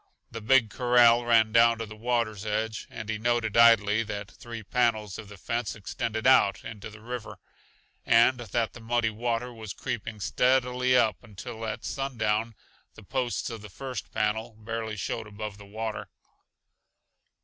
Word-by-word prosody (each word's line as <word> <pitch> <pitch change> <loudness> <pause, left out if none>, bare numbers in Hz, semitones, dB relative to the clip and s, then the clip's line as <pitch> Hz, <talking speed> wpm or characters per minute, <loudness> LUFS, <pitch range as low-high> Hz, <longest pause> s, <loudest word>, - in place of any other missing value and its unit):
The 115 0 -6
big 115 -1 +4
corral 120 -1 +5
ran 115 -2 +4
down 115 +1 +5
to 115 - -4
the 105 0 -10
water's 110 -2 -1
edge, 110 +1 -2
and 110 - -8
he 110 -1 -3
noted 120 -1 0
idly 115 -2 +6
that 105 -3 -5
three 115 +3 -9
panels 110 -3 0
of 105 -2 -9
the 100 - -11
fence 115 +4 -3
extended 110 +2 -4
out 115 -7 +4
into 110 -2 -7
the 110 0 -13
river, 120 -1 -6 0.7
and 120 +2 +4
that 115 -1 -2
the - - -11
muddy 115 0 0
water 120 +2 -2
was 110 -3 -7
creeping 110 -1 -5
steadily 125 +4 +2
up 105 -6 +3
until 110 +1 -7
at 110 +1 -5
sundown 115 -4 -1 0.4
the 110 - -13
posts 125 +2 -2
of 115 -2 -7
the 105 - -10
first 125 -1 -7
panel 110 +2 -1
barely 110 0 -5
showed 110 +3 -4
above 105 -1 -7
the 100 - -12
water. 110 +1 -5
115 Hz, 160 wpm, -27 LUFS, 105-120 Hz, 0.7 s, idly